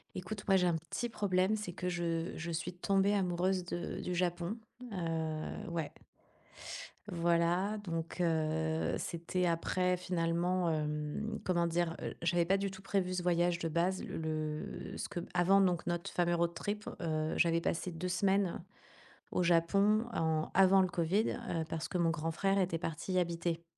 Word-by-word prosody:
Écoute, 200 Hz, +2 st, -5 dB
moi, 195 Hz, -1 st, +6 dB
j'ai 180 Hz, -1 st, +3 dB
un 170 Hz, -, +2 dB
petit 240 Hz, +9 st, -3 dB
problème, 200 Hz, -1 st, +2 dB
c'est 205 Hz, -5 st, -4 dB
que 180 Hz, 0 st, -2 dB
je 170 Hz, -1 st, -1 dB
je 170 Hz, +2 st, -4 dB
suis 165 Hz, +2 st, -3 dB
tombée 195 Hz, +2 st, +2 dB
amoureuse, 185 Hz, -1 st, +1 dB
de 175 Hz, 0 st, -4 dB
du 180 Hz, -, -3 dB
Japon, 175 Hz, +3 st, -1 dB, 0.3 s
heu, 160 Hz, -3 st, -3 dB
ouais 165 Hz, -3 st, -2 dB, 1.2 s
voilà, 175 Hz, +4 st, +2 dB
donc 165 Hz, -2 st, -4 dB
heu, 160 Hz, -1 st, +1 dB
c'était 170 Hz, +2 st, -2 dB
après 180 Hz, +2 st, +1 dB
finalement, 175 Hz, 0 st, 0 dB
hem, 150 Hz, +7 st, -2 dB
comment 175 Hz, -2 st, +2 dB
dire? 170 Hz, 0 st, 0 dB
Heu, -, -, -3 dB
j'avais 170 Hz, 0 st, +2 dB
pas 195 Hz, +3 st, +3 dB
du 195 Hz, 0 st, -2 dB
tout 190 Hz, 0 st, -10 dB
prévu 190 Hz, -2 st, 0 dB
ce 180 Hz, -, -1 dB
voyage 175 Hz, 0 st, +2 dB
de 165 Hz, -, -1 dB
base. 175 Hz, +4 st, +1 dB
Le -, -, -5 dB, 0.7 s
le -, -, -6 dB
ce -, -, -4 dB
que 175 Hz, -, -3 dB
avant, 185 Hz, +3 st, +5 dB
donc 180 Hz, -3 st, +2 dB
notre 175 Hz, 0 st, -2 dB
fameux 175 Hz, -1 st, +2 dB
road 170 Hz, 0 st, +1 dB
trip, 210 Hz, +3 st, -4 dB
heu, 155 Hz, -2 st, 0 dB
j'avais 170 Hz, -1 st, +3 dB
passé 175 Hz, +2 st, -1 dB
2 170 Hz, +2 st, -4 dB
semaines 190 Hz, -1 st, +1 dB, 0.7 s
au 180 Hz, -, +1 dB
Japon 195 Hz, +6 st, +4 dB
en 160 Hz, -1 st, 0 dB
avant 195 Hz, 0 st, +6 dB
le 185 Hz, -, +2 dB
covid, 175 Hz, +5 st, +1 dB, 0.2 s
heu, 165 Hz, -1 st, 0 dB
parce 165 Hz, 0 st, -3 dB
que 180 Hz, -, -2 dB
mon 170 Hz, -1 st, +3 dB
grand 165 Hz, 0 st, -1 dB
frère 195 Hz, +3 st, +1 dB
était 180 Hz, -3 st, +1 dB
parti 165 Hz, +2 st, -4 dB
y 185 Hz, -, +4 dB
habiter. 170 Hz, -1 st, -1 dB
175 Hz, 170 wpm, -34 LUFS, 165-185 Hz, 1.2 s, moi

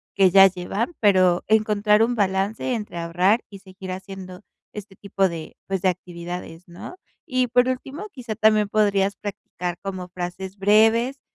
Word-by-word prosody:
que 195 Hz, -2 st, +5 dB
ya 195 Hz, 0 st, +8 dB
llevan, 195 Hz, -, -4 dB
pero 185 Hz, -4 st, +4 dB
encontrar 210 Hz, 0 st, +3 dB
un 240 Hz, +2 st, +1 dB
balance 200 Hz, +4 st, -1 dB
entre 210 Hz, -6 st, -6 dB
ahorrar 180 Hz, +7 st, +1 dB
y 200 Hz, -2 st, -11 dB
seguir 190 Hz, -1 st, -10 dB
haciendo 185 Hz, 0 st, -8 dB, 0.3 s
este 200 Hz, -2 st, -10 dB
tipo 195 Hz, -1 st, 0 dB
de, 165 Hz, -3 st, -8 dB
pues, 190 Hz, -2 st, -2 dB
de 190 Hz, -, +3 dB
actividades, 175 Hz, -1 st, -7 dB
¿no?, 175 Hz, -, -10 dB, 0.3 s
y 255 Hz, -2 st, 0 dB
por 245 Hz, +2 st, +3 dB
último, 275 Hz, +10 st, -5 dB
quizá 235 Hz, -5 st, -6 dB
también 215 Hz, -1 st, +3 dB
podrías 200 Hz, -2 st, +1 dB
practicar 180 Hz, -4 st, -6 dB
como 185 Hz, -2 st, -6 dB
frases 185 Hz, +2 st, -6 dB
breves 225 Hz, +6 st, +3 dB
195 Hz, 155 wpm, -23 LUFS, 185-215 Hz, 0.3 s, ya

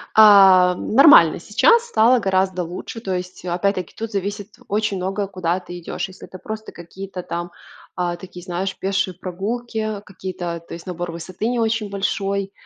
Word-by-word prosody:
А, 195 Hz, -4 st, +7 dB
нормально, 220 Hz, -, +6 dB
сейчас 465 Hz, -, +3 dB
стало 240 Hz, -, +4 dB
гораздо 190 Hz, -2 st, 0 dB
лучше. 180 Hz, +7 st, -7 dB
То 190 Hz, -4 st, -2 dB
есть, 180 Hz, 0 st, -6 dB
опять-таки, 180 Hz, +1 st, -1 dB
тут 225 Hz, 0 st, -5 dB
зависит 205 Hz, +1 st, -4 dB, 0.2 s
очень 210 Hz, -1 st, -1 dB
многое, 195 Hz, +2 st, -2 dB
куда 185 Hz, -2 st, -2 dB
ты 175 Hz, -1 st, -9 dB
идешь. 170 Hz, -, -4 dB
Если 190 Hz, 0 st, -13 dB
это 185 Hz, -, -10 dB
просто 220 Hz, +3 st, -7 dB
какие-то, 185 Hz, +2 st, -8 dB
там, 175 Hz, +1 st, -5 dB, 0.4 s
а, 175 Hz, -1 st, -1 dB
такие, 180 Hz, 0 st, -11 dB
знаешь, 185 Hz, +1 st, -3 dB
пешие 195 Hz, -1 st, -1 dB
прогулки, 215 Hz, +3 st, -4 dB
какие-то, 180 Hz, -4 st, -6 dB
то -, -, -9 dB
есть, 170 Hz, -, -9 dB
набор 175 Hz, -1 st, -5 dB
высоты 185 Hz, +6 st, -5 dB
не 245 Hz, -1 st, 0 dB
очень 220 Hz, -2 st, 0 dB
большой. 200 Hz, 0 st, -2 dB
190 Hz, 160 wpm, -21 LUFS, 180-210 Hz, 0.4 s, А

